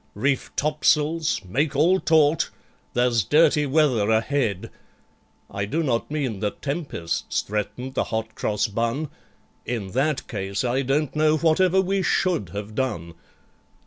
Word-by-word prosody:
Reef 135 +6 0
topsails! 150 +1 +1
Make 140 - -1
all 175 +7 +4
taut! 160 -2 +3 0.5
There's 120 -3 +2
dirty 150 - +3
weather 130 -8 +2
ahead! 110 -3 0 0.8
(I 100 0 -3
do 160 +11 -1
not 120 -6 -1
mean 135 -9 -2
that 105 0 -4
tempests 140 - -2
threatened 115 +5 -4
the - - 0
Hot 110 0 -3
Cross 105 -1 -1
Bun: 115 +8 -1 0.5
In 110 -6 -4
that 135 +4 0
case, 100 -2 -3
I 125 +2 +1
don't 140 +3 0
know 155 0 +3
whatever 175 +4 +3
we 195 +1 +1
should 180 - +1
have 105 +2 -6
done!) 105 -10 -3
135 Hz, 135 wpm, -24 LUFS, 110-155 Hz, 0.8 s, all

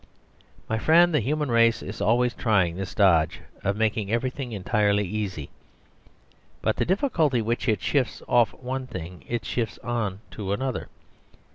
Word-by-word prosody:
My 110 - -1
friend, 170 +5 +5
the 150 - +4
human 145 +3 -1
race 115 0 +4
is 100 +1 -7
always 120 +4 +2
trying 95 -8 +1
this 95 0 -5
dodge 85 -6 +3 0.2
of 100 +1 0
making 110 -2 0
everything 125 +2 -2
entirely 105 0 +1
easy; 95 -7 -4 1.1
but - - 0
the - - +1
difficulty 170 - +1
which 115 +2 -1
it 105 -3 0
shifts 135 -4 0
off 120 -3 +4
one 130 +1 -5
thing 90 -5 -8
it 120 -1 -3
shifts 115 -4 -2
on 110 -5 -2
to 100 -2 -3
another. 130 +4 -3
115 Hz, 150 wpm, -25 LUFS, 100-125 Hz, 1.1 s, friend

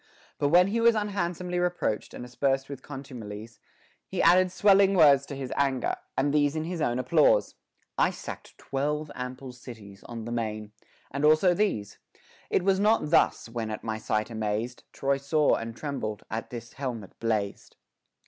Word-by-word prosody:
But 145 - +2
when 180 +4 +5
he 230 +3 0
was 235 0 +5
unhandsomely 180 -4 -2
reproached 175 -11 -1
and 125 - -7
aspersed 135 +2 -1
with 140 -2 -7
contumelies, 115 -6 -9 0.5
he - - -5
added 180 +2 +5
swelling 195 0 +5
words 140 -5 +6
to 140 - -6
his 135 -2 -5
anger, 135 -3 +1 0.2
and 140 +2 +1
these 145 0 +2
in 155 - -1
his 170 0 -4
own 120 -4 +1
applause: 140 +5 +3 0.5
I - - +4
sacked - - -9
twelve 150 +2 -2
ample 125 +1 -6
cities 110 -5 -12
on 115 -2 -7
the 120 - -5
main; 110 -2 -3 0.4
and 140 +2 -3
also 155 +4 +5
these: 140 - -1 0.5
It 185 - +1
was 195 0 +3
not 210 -7 +2
thus, 165 - +3
when, 115 -1 -4
at 105 - -5
my 110 -1 -3
sight 110 +1 -1
amazed, 110 +2 -3
Troy 140 0 0
saw 145 +2 +2
and 115 0 -3
trembled, 110 -8 -4
as 110 +1 -3
this 120 -1 -8
helmet 120 -8 -6
blazed. 110 -3 -2
135 Hz, 165 wpm, -27 LUFS, 115-165 Hz, 0.5 s, words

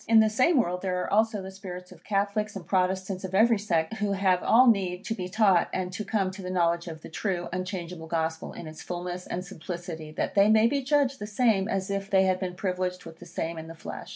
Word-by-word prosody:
In 225 0 +7
the 220 -1 +4
same 260 +7 +4
world 180 -5 0
there 185 -1 -1
are - - -4
also 215 -1 +2
the 190 - -7
spirits 180 -2 -9
of - - -15
Catholics, 205 +1 -1
and 185 -3 -7
Protestants 185 0 0
of 190 0 -4
every 225 +1 +5
sect, 175 -1 0
who 205 -1 0
have 190 -2 +2
all 245 +3 +6
need 190 -5 +2
to 225 - -1
be 185 -4 -5
taught, 195 -3 +3
and 185 -1 -3
to 210 - -3
come 200 -3 0
to 190 +1 -9
the 180 - -5
knowledge 170 -1 +1
of 160 -2 -7
the - - -7
true, 175 0 -2
unchangeable 180 -3 -4
Gospel, 160 0 -2
in - - -8
its 155 0 -9
fulness 180 0 -5
and 180 +1 -4
simplicity, 170 -3 -7
that - - -2
they 200 +1 +5
may 220 0 +6
be 275 +4 +2
judged 275 0 +1
the 210 - -5
same 210 -3 +2
as 195 -2 -2
if 195 0 -3
they 190 -1 +4
had 185 -1 +2
been 180 -2 -3
privileged 180 -1 -2
with 165 -1 -11
the 175 - -11
same 165 -1 -4
in 160 - -8
the 165 - -9
flesh. - - -8
190 Hz, 245 wpm, -27 LUFS, 180-210 Hz, -, In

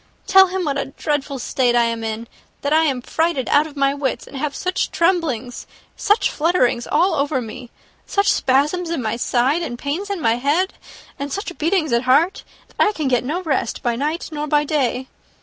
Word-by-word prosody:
Tell 385 0 +7
him 370 -1 -2
what 280 -2 -1
a - - -1
dreadful 285 0 -3
state 245 0 +1
I 240 - +5
am 230 -1 -2
in 225 +1 -4 0.3
that 285 +1 0
I 320 +1 +4
am 260 -5 -1
frightened 320 -5 0
out 295 +2 +4
of 295 -2 -13
my 275 0 +2
wits; 270 -4 -2
and - - -13
have 285 +1 -3
such 365 0 -1
tremblings, 320 -9 0 0.3
such 415 +2 +2
flutterings 295 -7 +1
all 345 +6 +2
over 280 -1 0
me, 240 +1 -8 0.4
such 400 0 +2
spasms 300 +7 +1
in 330 -7 -2
my 220 0 -1
side, 255 +6 +1
and 240 -8 -4
pains 305 +10 -3
in 400 -2 -2
my 230 -6 +2
head, 300 +9 +1 0.5
and 280 0 -4
such 390 -1 -4
beatings 320 -4 +1
at 235 - +4
my - - -10
heart, 315 +9 +3 0.3
that - - -25
I 420 - +2
can 305 -7 -2
get 245 -2 +2
no 325 +8 -3
rest 275 -8 -1
by 240 -1 +1
night 300 +7 -2
nor 300 -1 -3
by 295 0 +3
day. 265 -4 -1
285 Hz, 205 wpm, -20 LUFS, 255-335 Hz, 0.5 s, Tell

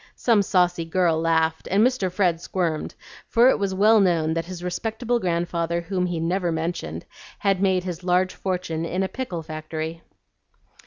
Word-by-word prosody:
Some 230 -4 +3
saucy 180 -3 +2
girl 165 -1 +1
laughed, 160 -1 +1
and 200 +5 +4
Mr. 250 -8 0
Fred 180 -3 +1
squirmed, 170 -4 -2 0.3
for 240 +2 +5
it - - +2
was 195 -1 -1
well 215 +3 +5
known 165 -5 +2
that 165 0 -2
his 180 -1 -7
respectable 225 +6 -2
grandfather 170 -2 -1
whom 180 +1 -2
he 175 -2 -2
never 175 +2 0
mentioned 165 +2 -3 0.3
had 195 -2 +1
made 190 -2 +2
his 180 -1 -5
large 180 +1 +2
fortune 180 -4 -3
in 180 +3 -1
a - - 0
pickle 190 -9 -5
factory. 155 +1 -5
180 Hz, 165 wpm, -24 LUFS, 165-190 Hz, 0.3 s, for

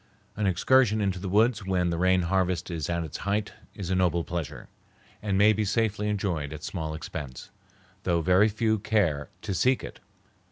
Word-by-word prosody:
An 105 -1 0
excursion 110 +4 +3
into 95 -3 0
the 95 0 -4
woods 110 +2 +3
when 90 -2 0
the 85 - -1
rain 95 0 +3
harvest 90 0 0
is 80 -2 -3
at 85 -1 -1
its 80 - -6
height 100 +2 -2 0.2
is 95 -3 -5
a - - +2
noble 90 -2 +2
pleasure, 85 -3 -5 0.5
and 100 -2 0
may 105 +2 +6
be 110 +1 0
safely 105 0 0
enjoyed 90 -8 -2
at 75 0 -9
small 80 -4 -4
expense, 75 -4 -7 0.5
though 85 -1 +1
very 95 +5 +4
few 110 0 0
care 100 -9 0
to 100 - -2
seek 130 +8 +2
it. - - -8
95 Hz, 185 wpm, -27 LUFS, 85-105 Hz, 0.5 s, may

